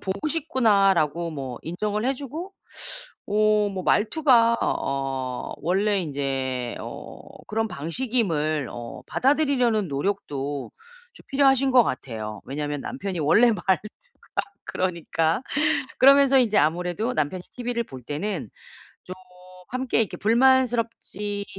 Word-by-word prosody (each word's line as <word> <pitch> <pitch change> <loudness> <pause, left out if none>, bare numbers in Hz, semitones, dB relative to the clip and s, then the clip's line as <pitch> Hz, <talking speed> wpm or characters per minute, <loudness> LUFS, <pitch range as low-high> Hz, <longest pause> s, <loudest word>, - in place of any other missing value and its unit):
보고 195 +11 -3
싶구나.'라고 195 - +2
뭐 135 -5 -6
인정을 210 +6 -2
해 265 +2 +1
주고 300 +8 -7 0.7
어 210 0 +3
뭐 190 -1 -4
말투가 235 0 +4
어 135 -2 -2
원래 195 +3 +1
인제 135 -5 -3
어 - - -8 0.3
그런 225 +1 -1
방식임을 160 - -1
어 120 -1 -8
받아들이려는 255 - +2
노력도 145 -3 -3 0.4
좀 - - -16
필요하신 270 -1 +3
것 250 -2 +7
같아요. 110 -4 -5
왜냐하면 145 +1 -4
남편이 200 -9 -4
원래 210 +11 +5
말투가 210 - -1 0.5
그러니까. 170 0 -1 0.6
그러면서 275 0 +7
인제 220 -4 +2
아무래도 180 +9 0
남편이 155 +4 -1
티브이를 245 -1 -2
볼 130 -7 -11
때는 155 - -4 1.0
좀 185 - -16 0.2
함께 255 -1 0
이렇게 220 - -3
불만스럽지 230 -4 +1
200 Hz, 270 characters per minute, -24 LUFS, 150-245 Hz, 1.0 s, 것